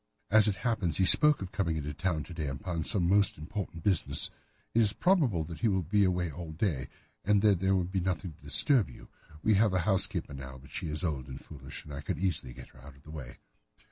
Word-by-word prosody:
"As 110 0 +7
it 105 - +1
happens, 100 -10 0
he 95 - +3
spoke 150 - +8
of 95 - -8
coming 85 -5 -1
into 75 -1 -4
town 80 -1 -2
to 90 - -10
day 80 -3 -4
upon 80 +5 -4
some 90 -3 0
most 100 +2 +3
important 85 0 -6
business. 95 -5 0 0.4
It 115 - +4
is 105 -2 +4
probable 140 - +2
that 85 +1 -9
he 115 - +1
will 95 -3 +1
be 100 +6 +2
away 90 -2 -1
all 80 0 -8
day, 80 -7 -2 0.4
and 105 0 +2
that 100 -4 +4
there 95 +1 +2
would 90 -1 -1
be 95 - 0
nothing 90 -1 -2
to 80 - -24
disturb 95 - +2
you. - - -14 0.3
We 110 - +3
have 105 0 +3
a 95 - +1
housekeeper 95 -7 0
now, 65 -1 -8
but 70 +2 -17
she 85 - -4
is 75 +3 -4
old 75 -6 -3
and 65 -1 -8
foolish, 70 -1 -11
and 75 - -10
I 70 - -6
could - - -4
easily 85 -9 -1
get - - -12
her 65 - -19
out 70 +1 -13
of 70 - -22
the 75 - -12
way." 70 -5 -9
90 Hz, 240 wpm, -30 LUFS, 75-100 Hz, 0.4 s, spoke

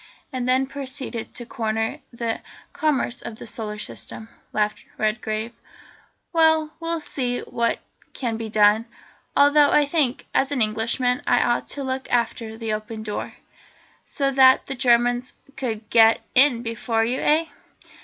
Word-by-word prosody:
"And 255 -1 -2
then 260 +1 +3
proceeded 265 -4 -6
to 240 - -5
corner 225 -2 -2
the 235 -2 -3 0.3
commerce 280 -5 0
of 220 - -7
the - - -9
Solar 215 -2 -4
System," 220 +1 -7 0.2
laughed 210 0 -1
Redgrave. 215 +1 -2 0.8
"Well, 320 -1 +3
we'll 330 0 -1
see 245 -4 -2
what 235 0 -1 0.4
can 235 -4 -2
be 225 0 -5
done. 215 +1 +4 0.5
Although 290 0 +6
I 295 - +4
think, 285 -4 0
as 270 - +2
an 280 - 0
Englishman, 230 +3 +1
I 245 - +4
ought 240 0 0
to 280 - -4
look 260 0 -3
after 230 -2 -1
the 225 -1 -3
Open 215 +1 -5
Door." 210 -1 -5 0.7
"So 275 -2 -1
that 260 -1 +6
the 275 - -4
Germans 245 -1 +2 0.2
could 230 -5 -4
get 225 -1 +6
in 255 -3 +5
before 230 -1 -1
you, 250 +3 -1
eh? 315 +2 +3
240 Hz, 145 wpm, -23 LUFS, 225-270 Hz, 0.8 s, Although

